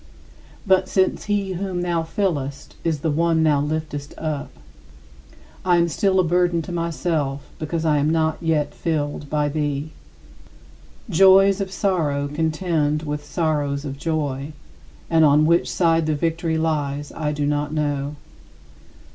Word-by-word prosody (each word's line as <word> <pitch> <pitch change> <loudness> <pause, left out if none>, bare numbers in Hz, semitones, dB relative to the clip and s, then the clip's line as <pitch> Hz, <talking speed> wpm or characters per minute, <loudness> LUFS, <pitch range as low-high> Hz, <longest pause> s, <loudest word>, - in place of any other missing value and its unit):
But 190 -1 +3
since 190 -1 +1
he 200 -2 -1
whom 185 -1 -3
thou 170 -2 0
fillest 155 -6 -3
is 160 -4 -1
the 160 - 0
one 165 +1 +2
thou 150 -3 +3
liftest 150 -1 -4
up, 155 -3 -3 1.1
I 180 -1 +3
am 170 0 +3
still 190 +2 +1
a - - +5
burden 175 0 +1
to 180 - -7
myself 165 -4 -2 0.2
because 160 +1 -2
I 150 -2 +3
am 145 +2 +2
not 160 -1 +1
yet 155 -3 0
filled 145 -3 -2
by 150 0 +1
thee. 145 0 -2 1.2
Joys 195 +1 +5
of 190 -1 -3
sorrow 155 -8 0
contend 155 0 0
with 150 -1 -4
sorrows 145 -4 -1
of 135 -1 -6
joy, 145 -2 -2 0.5
and 165 -1 +4
on 150 0 +5
which 170 +2 +3
side 165 -2 +2
the 155 - +1
victory 165 +1 -1
lies 145 -3 -1
I 150 -2 -2
do 145 -1 -1
not 145 0 -1
know. 145 -1 -2
155 Hz, 145 wpm, -22 LUFS, 145-170 Hz, 1.2 s, a